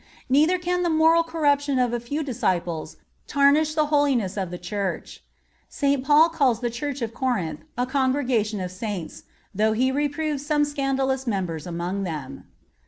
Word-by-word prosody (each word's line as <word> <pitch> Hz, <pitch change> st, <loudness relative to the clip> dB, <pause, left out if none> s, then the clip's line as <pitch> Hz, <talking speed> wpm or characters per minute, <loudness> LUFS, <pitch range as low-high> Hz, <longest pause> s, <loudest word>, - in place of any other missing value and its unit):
Neither 310 Hz, +7 st, +4 dB
can 360 Hz, 0 st, -1 dB
the 350 Hz, -, +1 dB
moral 320 Hz, +1 st, +4 dB
corruption 290 Hz, -4 st, +1 dB
of 250 Hz, -2 st, +1 dB
a 240 Hz, -, 0 dB
few 285 Hz, +7 st, -3 dB
disciples 185 Hz, -, -2 dB, 0.3 s
tarnish 295 Hz, +2 st, +3 dB
the 305 Hz, -1 st, +3 dB
holiness 270 Hz, -10 st, +2 dB
of 190 Hz, -3 st, -2 dB
the 180 Hz, -, -6 dB
Church. 195 Hz, +2 st, -4 dB, 0.5 s
St. 280 Hz, -2 st, 0 dB
Paul 300 Hz, +4 st, +5 dB
calls 275 Hz, -8 st, +1 dB
the 240 Hz, -1 st, -2 dB
Church 275 Hz, +2 st, -4 dB
of 225 Hz, 0 st, -4 dB
Corinth 195 Hz, -, -2 dB, 0.2 s
a 245 Hz, -, +1 dB
congregation 255 Hz, -5 st, 0 dB
of 180 Hz, -1 st, -4 dB
Saints,(53) 185 Hz, -4 st, -6 dB, 0.3 s
though 215 Hz, +2 st, +2 dB
he 255 Hz, +4 st, +1 dB
reproves 290 Hz, +1 st, -1 dB
some 295 Hz, 0 st, +2 dB
scandalous 270 Hz, -2 st, -1 dB
members 180 Hz, -7 st, -2 dB
among 175 Hz, +3 st, -3 dB
them. 155 Hz, -8 st, -6 dB
260 Hz, 160 wpm, -24 LUFS, 205-290 Hz, 0.5 s, Paul